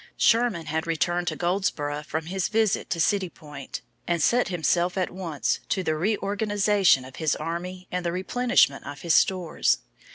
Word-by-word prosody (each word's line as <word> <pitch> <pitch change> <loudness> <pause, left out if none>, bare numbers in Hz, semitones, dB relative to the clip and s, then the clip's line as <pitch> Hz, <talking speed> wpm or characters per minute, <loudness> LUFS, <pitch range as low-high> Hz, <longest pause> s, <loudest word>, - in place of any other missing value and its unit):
Sherman 225 -8 +3
had 160 +2 -2
returned 175 +2 0
to - - 0
Goldsboro 170 -5 -1
from 160 +1 -4
his 190 +2 -1
visit 220 -2 +1
to 170 - -2
City 190 +2 +2
Point, 145 -4 -9 0.3
and 175 -1 +1
set 240 +10 +3
himself 175 0 0
at 185 - 0
once 175 -6 -2
to 190 - 0
the 160 - 0
reorganization 205 - +2
of 130 - -12
his 160 -3 +1
army 180 +3 -5
and 180 0 -2
the 170 - -1
replenishment 190 - +2
of 145 0 -8
his 170 +1 +1
stores. 180 -2 +2
175 Hz, 165 wpm, -25 LUFS, 160-195 Hz, 0.3 s, Sherman